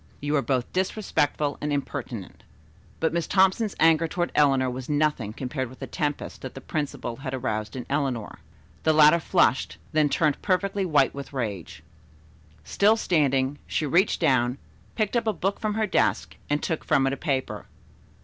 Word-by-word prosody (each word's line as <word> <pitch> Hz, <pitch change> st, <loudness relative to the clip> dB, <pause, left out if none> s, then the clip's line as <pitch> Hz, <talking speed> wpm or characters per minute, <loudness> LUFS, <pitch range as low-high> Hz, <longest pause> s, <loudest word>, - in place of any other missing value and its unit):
You 145 Hz, +1 st, -1 dB
are 140 Hz, -, +3 dB
both 130 Hz, -3 st, -1 dB
disrespectful 160 Hz, -6 st, 0 dB
and 150 Hz, -, -2 dB
impertinent." 130 Hz, -7 st, -5 dB, 0.6 s
But 160 Hz, -, 0 dB
Miss 170 Hz, -1 st, -1 dB
Thompson's 195 Hz, +2 st, +2 dB
anger 165 Hz, 0 st, +4 dB
toward 175 Hz, +1 st, -2 dB
Eleanor 135 Hz, -3 st, +3 dB
was 125 Hz, +1 st, -5 dB
nothing 145 Hz, -7 st, 0 dB
compared 130 Hz, +2 st, -4 dB
with 130 Hz, -, -13 dB
the -, -, -6 dB
tempest 150 Hz, -4 st, -3 dB
that 130 Hz, -, -7 dB
the -, -, -6 dB
principal 135 Hz, -4 st, -4 dB
had 135 Hz, 0 st, -4 dB
aroused 110 Hz, -4 st, -3 dB
in 125 Hz, -, -5 dB
Eleanor. 135 Hz, -6 st, -2 dB, 0.4 s
The 160 Hz, -, +3 dB
latter 155 Hz, +2 st, +6 dB
flushed, 170 Hz, -6 st, +1 dB
then 155 Hz, -2 st, +3 dB
turned 150 Hz, -1 st, +1 dB
perfectly 195 Hz, 0 st, 0 dB
white 145 Hz, -5 st, +3 dB
with 140 Hz, 0 st, -8 dB
rage. 105 Hz, -, -5 dB, 0.8 s
Still 210 Hz, -, +3 dB
standing, 140 Hz, -, +1 dB
she 155 Hz, -, -1 dB
reached 175 Hz, +8 st, +2 dB
down, 125 Hz, -1 st, +2 dB, 0.4 s
picked 215 Hz, 0 st, -1 dB
up 235 Hz, -1 st, +1 dB
a 220 Hz, -, +2 dB
book 195 Hz, +2 st, -2 dB
from 215 Hz, -1 st, -2 dB
her 220 Hz, 0 st, +1 dB
desk 200 Hz, -, 0 dB
and 145 Hz, 0 st, 0 dB
took 160 Hz, -3 st, -2 dB
from 135 Hz, -, +2 dB
it 135 Hz, -, +1 dB
a -, -, -1 dB
paper. 135 Hz, -2 st, -3 dB
145 Hz, 170 wpm, -25 LUFS, 130-170 Hz, 0.8 s, latter